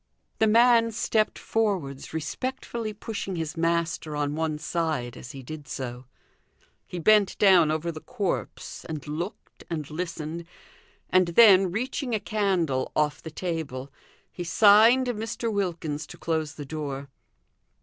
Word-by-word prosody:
The 220 - +4
man 230 +1 +5
stepped 215 0 0
forwards, 190 -12 -1
respectfully 230 - -4
pushing 205 -2 -5
his 160 -1 -3
master 165 -2 0
on 145 0 -1
one 160 -1 -1
side 155 -6 -2
as 120 - -9
he 135 -1 -9
did 150 +2 -8
so. 125 -1 -6 0.8
He 180 - -6
bent 205 +3 +4
down 185 -6 +6
over 160 +2 -1
the 155 -1 -9
corpse, 195 -4 -4
and 155 -2 -6
looked, 170 +7 -6
and 155 -4 -3
listened 165 0 -4 0.7
and 185 -1 +5
then 190 0 +7
reaching 250 - -2
a - - 0
candle 185 - 0
off 150 -1 +1
the 160 - -7
table, 155 -6 -4 0.4
he 175 - -6
signed 215 +8 +6
Mr. 225 -1 -3
Wilkins 165 -6 -2
to 175 - -11
close 160 -3 -2
the 145 - -7
door. 140 -2 -5
170 Hz, 140 wpm, -26 LUFS, 150-210 Hz, 0.8 s, then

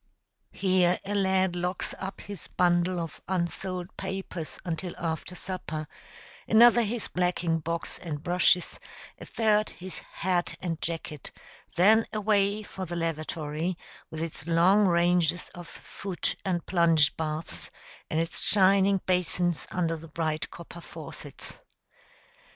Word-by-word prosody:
Here 185 -2 +3
a 200 - -2
lad 190 -2 +2
locks 180 +1 -2
up 190 +1 -5
his 200 -5 -8
bundle 175 0 +2
of 165 -1 -6
unsold 185 0 -2
papers 190 -4 -5
until 175 +1 -3
after 165 +2 -3
supper, 170 -5 -4 0.6
another 240 +1 +7
his 230 +1 -2
blacking 175 -2 0
box 165 +2 -3
and 155 -4 -5
brushes, 180 0 +2 0.4
a - - -8
third 215 -1 +2
his 185 +1 -8
hat 180 -1 -1
and 165 -3 -3
jacket; 160 -3 -5 0.4
then 220 +5 +5
away 210 -1 +2
for 190 -2 -7
the 175 - -4
lavatory, 165 0 -2 0.3
with 160 0 -4
its 165 -1 -6
long 185 +5 +5
ranges 175 -1 +2
of 175 -1 -9
foot 185 +4 -4
and 175 -3 -1
plunge 165 -4 +4
baths, 155 0 -4 0.4
and 155 - 0
its 165 +1 -1
shining 195 -1 +4
basins 180 -2 +1
under 165 -2 0
the 165 +1 -10
bright 155 -2 -2
copper 170 0 -10
faucets. - - -9
175 Hz, 130 wpm, -28 LUFS, 165-190 Hz, 0.6 s, another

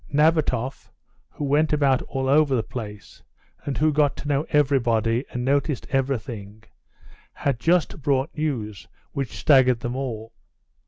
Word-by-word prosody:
Nabatoff, 145 -4 +1 0.4
who - - -7
went 150 +3 +2
about 140 -4 +3
all 135 -2 -3
over 140 0 +4
the 115 - 0
place, 105 -5 -8 0.4
and 140 - -3
who 155 0 +2
got 145 -1 +2
to - - -7
know 145 +1 0
everybody, 120 -4 +2
and 125 0 -4
noticed 140 0 0
everything, 115 -6 -3 0.7
had 140 -4 -1
just 165 +2 +1
brought 140 +4 0
news 120 - -3 0.2
which 135 -3 -4
staggered 130 -4 +4
them 120 +1 -3
all. 115 -4 -5
135 Hz, 140 wpm, -24 LUFS, 120-145 Hz, 0.7 s, over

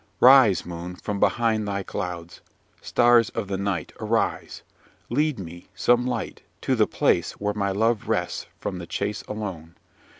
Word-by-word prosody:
"Rise 125 -6 +6
moon! 90 +1 -7
from 100 +2 -4
behind 110 -2 +1
thy 100 -1 -2
clouds. 90 -2 -6 0.4
Stars 120 -2 +4
of 115 -4 -2
the 95 0 -2
night, 100 -5 -2
arise! - - -1 0.5
Lead 150 +2 +1
me, 85 -2 -9
some 120 +6 +2
light, 125 - -4 0.2
to - - 0
the - - +3
place - - +1
where 105 0 -2
my 100 -1 -1
love 110 +3 0
rests - - -1
from 90 - -4
the 85 - -8
chase 100 +3 -3
alone! 95 -6 -6
100 Hz, 155 wpm, -24 LUFS, 90-115 Hz, 0.5 s, Rise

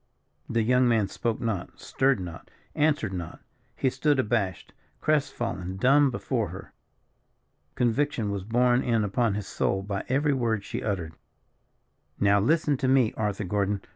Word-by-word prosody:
The 115 -1 +1
young 125 +2 +3
man 110 -4 +2
spoke 115 +2 -2
not, 110 -7 -3
stirred 135 -4 +1
not, 85 -3 -8 0.2
answered 145 -9 +1
not. 85 -3 -6 0.4
He 130 - +1
stood 145 +3 +1
abashed, 105 -7 -1 0.3
crest 150 -2 +1
fallen, 95 -6 -4
dumb 140 +6 +4
before 120 -4 -2
her. 95 +3 -10 1.0
Conviction 120 -3 0
was 100 -2 -3
borne 120 +4 +2
in 115 -3 +1
upon 105 +1 0
his 105 -2 -4
soul 95 0 -1
by 100 0 -3
every 140 +3 +2
word 115 -5 0
she - - -5
uttered. 90 -7 -3 1.1
"Now 100 0 +4
listen 150 +5 +2
to 130 - -1
me, 130 -4 +3
Arthur 105 -2 -2
Gordon. 100 +1 -1
115 Hz, 150 wpm, -27 LUFS, 100-130 Hz, 1.1 s, dumb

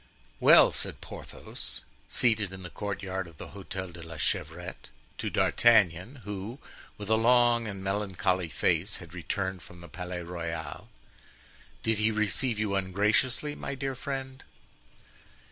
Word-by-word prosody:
Well," - - +8
said - - -2
Porthos, - - -7 0.3
seated 110 -5 +2
in 95 0 -8
the 85 - -7
courtyard 95 -2 -3
of 80 -3 -15
the - - -8
Hotel 95 -2 -6
de 85 0 -10
la 80 -1 -8
Chevrette, 75 - -2 0.3
to - - -1
D'Artagnan, 110 +2 +4
who, 105 +4 -5 0.4
with 105 - -7
a 110 - +3
long 120 0 +4
and 100 -2 -5
melancholy 95 -3 0
face, 85 +6 +1
had 85 -2 -11
returned 95 +1 -2
from 85 +3 -13
the 85 - -10
Palais 90 +1 -5
Royal; 85 -3 -5 0.9
"did 110 -1 +1
he 110 +1 +4
receive 105 +2 +1
you 105 -2 0
ungraciously, 105 +9 +2
my 140 - -5
dear 135 0 -2
friend?" 135 0 -5
100 Hz, 140 wpm, -29 LUFS, 90-110 Hz, 0.9 s, Well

